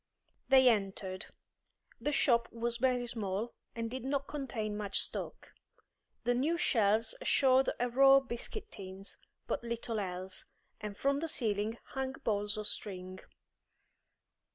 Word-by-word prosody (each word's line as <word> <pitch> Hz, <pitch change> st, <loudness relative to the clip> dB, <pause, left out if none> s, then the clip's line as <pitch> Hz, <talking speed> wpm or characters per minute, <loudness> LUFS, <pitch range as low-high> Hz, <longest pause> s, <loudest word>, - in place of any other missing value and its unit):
They 260 Hz, -1 st, +7 dB
entered. 195 Hz, -4 st, 0 dB, 0.7 s
The 295 Hz, -, 0 dB
shop 235 Hz, -4 st, +3 dB
was 235 Hz, 0 st, -1 dB
very 250 Hz, 0 st, +2 dB
small 220 Hz, -1 st, -3 dB, 0.2 s
and 230 Hz, -1 st, -2 dB
did 260 Hz, 0 st, -4 dB
not 275 Hz, +1 st, 0 dB
contain 235 Hz, -7 st, -3 dB
much 205 Hz, -1 st, 0 dB
stock. -, -, -3 dB, 0.7 s
The 245 Hz, +1 st, +2 dB
new 295 Hz, +8 st, +1 dB
shelves 225 Hz, -, +2 dB
showed 265 Hz, -, +4 dB
a 245 Hz, -, +2 dB
row 270 Hz, +3 st, +7 dB
of 270 Hz, -1 st, +3 dB
biscuit 405 Hz, -, -5 dB
tins, 195 Hz, -1 st, -7 dB, 0.3 s
but -, -, -2 dB
little 235 Hz, -1 st, -2 dB
else, 185 Hz, -1 st, -4 dB, 0.3 s
and 210 Hz, -1 st, -6 dB
from 280 Hz, +1 st, +2 dB
the 325 Hz, -, -2 dB
ceiling 220 Hz, -5 st, -1 dB
hung 265 Hz, -1 st, -2 dB
balls 210 Hz, -1 st, 0 dB
of 215 Hz, -, -3 dB
string. 185 Hz, -3 st, -1 dB
235 Hz, 135 wpm, -33 LUFS, 205-265 Hz, 0.7 s, They